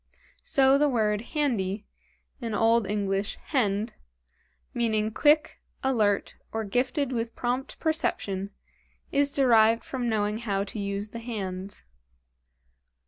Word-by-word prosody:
So 270 0 +4
the 295 0 +4
word 215 -4 +1 0.2
handy, 210 -8 0 0.5
in 230 -4 -3
old 225 0 +3
English 200 0 -1
hend, 220 -5 0 0.8
meaning 220 -2 0
quick, 300 +6 +3 0.2
alert, 215 -7 +1
or 225 0 -2
gifted 250 +6 0
with 230 -1 -3
prompt 250 +2 -2
perception, 200 - -1 0.6
is 285 0 +2
derived 230 -4 +5
from 250 -3 -3
knowing 210 0 0
how 200 -4 -1
to 205 +2 -6
use 200 +1 -3
the 230 - -7
hands. 200 -4 -5
225 Hz, 115 wpm, -27 LUFS, 205-255 Hz, 0.8 s, derived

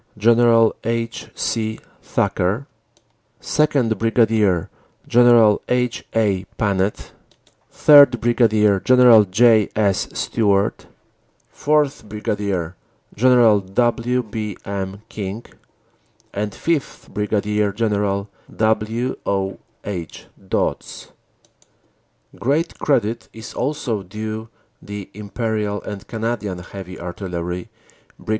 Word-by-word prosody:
General 115 +1 +4
H. 115 +1 -3
C. 110 -1 -2 0.2
Thacker; 100 +10 -1 0.7
2nd., 135 -8 +1
Brig. 110 -6 +2 0.4
General 120 -3 +5
H. 125 -1 0
A. 100 -4 +1
Panet; 100 -1 -1 0.6
3rd., 140 -5 +6
Brig. 110 -4 +2
General 125 -4 +6
J. 110 +2 +4
S. 100 -3 +1
Stewart; 100 -3 0 0.7
4th., 145 -7 0
Brig. 100 -5 -3 0.4
General 120 -2 +5
W. 120 +5 0
B. 105 -2 -5
M. 100 0 -5
King; 105 0 -6 0.9
and 105 +1 -2
5th., 150 +9 -3
Brig. 105 -1 -1
General 100 -2 0 0.3
W. 110 +3 0
O. 95 -1 -1 0.3
H. 90 -5 -6 0.2
Dodds. - - -3 1.3
Great 150 +7 -1
credit 115 -5 0
is 110 -1 -9
also 125 -6 -2
due 110 +3 -6 0.3
the 100 -1 -8
Imperial 105 0 -3
and 100 -1 -8
Canadian 110 -4 -3
Heavy 90 +1 -9
Artillery, 90 0 -5 0.5
Brig. - - -14
110 Hz, 90 wpm, -20 LUFS, 100-120 Hz, 1.3 s, 3rd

